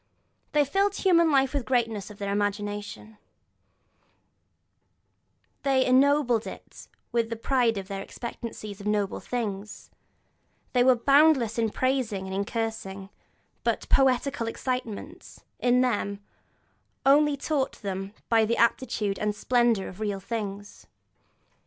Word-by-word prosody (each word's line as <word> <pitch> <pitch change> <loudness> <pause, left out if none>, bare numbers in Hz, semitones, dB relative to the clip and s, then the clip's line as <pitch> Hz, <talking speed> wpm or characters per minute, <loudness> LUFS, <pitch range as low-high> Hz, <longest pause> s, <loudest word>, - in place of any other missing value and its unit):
They 295 -1 +4
filled 390 +8 +1
human 340 -4 +4
life 270 -1 +3
with 285 - 0
the - - -16
greatness 230 -6 0
of 210 - -12
their 200 -1 -3
imagination, 205 +1 -3 2.4
they 265 -2 +2
ennobled 255 -3 +3
it - - -11 0.2
with 230 -1 0
the 230 - -3
pride 235 -1 +1
of 195 -1 -5
their 195 -1 -5
expectancy 230 -1 -7
of 200 +1 -8
noble 205 -2 0
things, 210 -4 -5 0.8
they 250 -1 +4
were 255 0 +6
boundless 275 -3 +4
in 225 -1 +2
praising 245 -5 -1
and 190 - -6
in 200 +1 -1
cursing; 210 -4 -4 0.5
but - - -1
poetical 265 -2 +2
excitement, 255 - -5 0.2
in 250 0 +3
them, 205 -5 0 0.9
only 290 +1 +5
taught 275 -1 -1
them 195 +1 -4 0.2
the 225 0 +3
amplitude 225 -4 +1
and 210 -1 -1
splendour 235 -3 +2
of 185 - -10
real 205 -2 -2
things. 205 -1 -6
230 Hz, 125 wpm, -27 LUFS, 205-260 Hz, 2.4 s, were